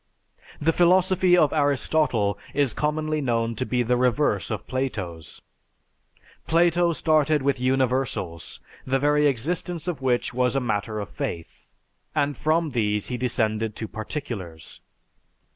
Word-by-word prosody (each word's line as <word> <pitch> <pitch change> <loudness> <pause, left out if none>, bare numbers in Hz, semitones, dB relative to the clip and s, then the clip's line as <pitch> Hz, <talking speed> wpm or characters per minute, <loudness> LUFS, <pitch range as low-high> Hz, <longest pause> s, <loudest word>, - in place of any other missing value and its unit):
The 165 +2 +2
philosophy 180 +1 +4
of 155 -4 +3
Aristotle 140 -7 +1 0.2
is 140 -4 +2
commonly 155 0 -1
known 115 -3 0
to 130 +2 -3
be 125 -1 +1
the 125 +1 +1
reverse 125 -4 +1
of 110 -2 -4
Plato's. 95 - -5 1.0
Plato 170 +1 +3
started 155 -2 +2
with 140 -2 +1
universals, 130 -9 -1 0.2
the 130 +1 0
very 150 +2 +3
existence 165 +6 -2
of 165 -7 -3
which 125 -2 0
was 125 +1 +1
a - - +3
matter 110 -3 -2
of 100 - -5
faith, 85 -1 -6 0.5
and 145 -1 +1
from 155 +3 0
these 105 -4 0
he 125 - -2
descended 110 -3 -1
to 110 - -5
particulars. 110 - -7
130 Hz, 130 wpm, -24 LUFS, 115-155 Hz, 1.0 s, philosophy